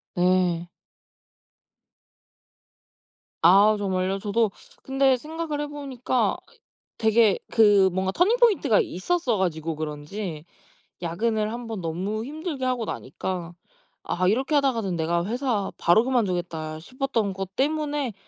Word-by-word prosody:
네. 175 -1 +2 2.7
아 205 +4 +6
정말요? 190 -1 -1
저도 210 +1 +1 0.3
근데 270 -1 +3
생각을 305 +2 -4
해 295 - -3
보니까 265 -4 -1 0.2
이 - - -24 0.4
되게 220 -2 +3
그 205 -4 +5
뭔가 190 0 0
터닝 385 - +3
포인트가 390 - +4
있었어 240 - -1
가지고 165 -3 -1
그런지 155 +2 -5 0.6
야근을 215 +5 -1
1 240 -1 -6
번 220 -3 -4
너무 190 +7 -3
힘들게 300 -2 -4
하고 250 -3 0
나니까 175 -4 -5 0.5
'아 180 +1 -1
이렇게 265 +8 +1
하다가는 230 -10 +1
내가 170 +1 0
회사 235 -3 -1
바로 195 +7 +4
그만두겠다.' 175 -10 -1
싶었던 235 -1 -2
것 195 0 -6
때문에 290 -3 -1
215 Hz, 255 characters per minute, -25 LUFS, 185-265 Hz, 2.7 s, 아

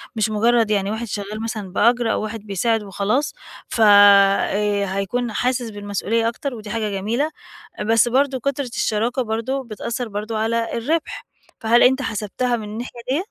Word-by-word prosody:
مش 220 0 +1
مجرّد 225 +1 +2
يعني 200 -1 +1
واحد 225 +2 -4
شغال 205 +2 -5
مثلًا 215 -4 -5
بأجر 240 0 +3
أو - - 0
واحد 220 +1 -5
بيساعد 215 +3 0
وخلاص 205 +8 -1 0.4
ف 230 - -2
آآ، 200 0 +5
هيكون 235 +4 -2
حاسس 245 +1 -1
بالمسؤولية 205 +2 -1
أكتر، 275 +2 -5
ودي 215 -2 -9
حاجة 220 -1 -2
جميلة، 225 +10 -1 0.5
بس 225 +2 +4
برضه 265 +2 +1
كُترة 280 +2 -2
الشراكة 235 +1 -1
برضه 235 +4 -2
بتأثّر 235 +1 -4
برضه 210 +2 -4
على 230 +1 -1
الربح، 305 +8 -2 0.3
فهل 230 +2 +4
أنت 265 +2 +4
حسبتها 225 +2 -2
من 225 - -5
الناحية 235 +3 -7
ديَّة؟ 310 +8 0
225 Hz, 160 wpm, -21 LUFS, 210-245 Hz, 0.5 s, آآ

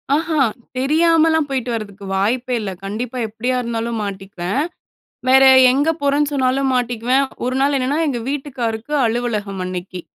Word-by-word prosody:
ஆஹா. 315 -1 0 0.4
தெரியாமலாம் 320 +3 +3
போய்ட்டு 255 -3 -2
வரதுக்கு 200 -3 -6
வாய்ப்பே 245 +5 0
இல்ல. 195 -2 -4
கண்டிப்பா. 230 +5 -4
எப்டியா 230 +4 -2
இருந்தாலும் 230 -1 -3
மாட்டிக்குவேன். 195 +2 -4 0.7
வேற 265 +1 +7 0.3
எங்க 285 +4 +1
போறேன்னு 285 +1 +1
சொன்னாலும் 265 0 +1
மாட்டிக்குவேன். 245 +2 +1 0.2
ஒரு 255 +1 -1
நாள் 280 +1 +2
என்னன்னா, 265 +3 0
எங்க 255 -4 -1
வீட்டுக்காருக்கு 260 -3 -3
அலுவலகம் 215 -5 -2
அன்னைக்கி. 180 0 -6
250 Hz, 130 wpm, -19 LUFS, 220-275 Hz, 0.7 s, வேற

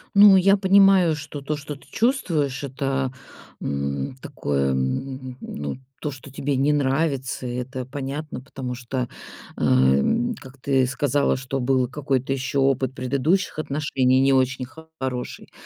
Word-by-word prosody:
Ну, 200 -1 +9
я 195 +2 +5
понимаю, 195 -4 +5
что 150 -1 -7
то, 150 +2 -2
что 145 0 -7
ты 140 - -18
чувствуешь,- 165 - 0
это, 135 -1 -1 0.5
м, 70 - -2
такое, 70 - -1
м 130 - -3
ну, 75 - -5 0.2
то, 150 - -2
что 135 0 -11
тебе 140 +1 -2
не 140 +3 +3
нравится. 135 -3 0
Это 125 +1 -4
понятно, 140 +2 -5
потому 130 -2 -6
что, 125 0 -3 0.5
а, - - -3
м, 70 - +3
как 135 0 -13
ты 130 -2 +2
сказала, 140 +1 +1
что 135 +1 -3
был 130 0 +2
какой-то 135 -1 -1
ещё 135 +1 -1
опыт 135 -1 +1
предыдущих 140 +8 0
отношений 135 -3 +1
не 135 0 +4
очень 130 -1 +1 0.3
хороший. 125 -2 -4
135 Hz, 140 wpm, -23 LUFS, 130-145 Hz, 0.5 s, Ну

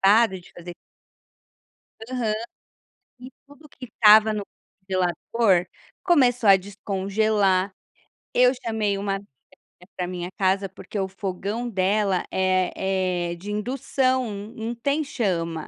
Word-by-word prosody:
para 225 +4 +6
de - - -16
fazer. 175 0 -9 1.4
Aham. 240 -4 -1 0.9
E 255 +1 -10 0.2
tudo 290 +2 -17
que 265 - -11
estava 220 -1 +6
no 210 -1 -3 0.4
congelador, 185 +1 +1 0.4
começou 255 - +3
a 195 - +9
descongelar, 200 0 0 0.6
eu 250 0 +5
chamei 220 -4 -1
uma 195 0 -2
amiga 200 +1 -11 0.7
pra 180 -1 -3
minha 180 -1 -5
casa, 195 +1 +1
porque 195 +2 -7
o 190 - 0
fogão 200 +4 -4
dela 195 -1 +1
é 185 -1 0
é - - -4
de 185 +4 -9
indução, 255 +3 0 0.3
não 225 +1 -4
tem 280 +6 0
chama, 170 - -2
200 Hz, 120 wpm, -24 LUFS, 185-230 Hz, 1.4 s, a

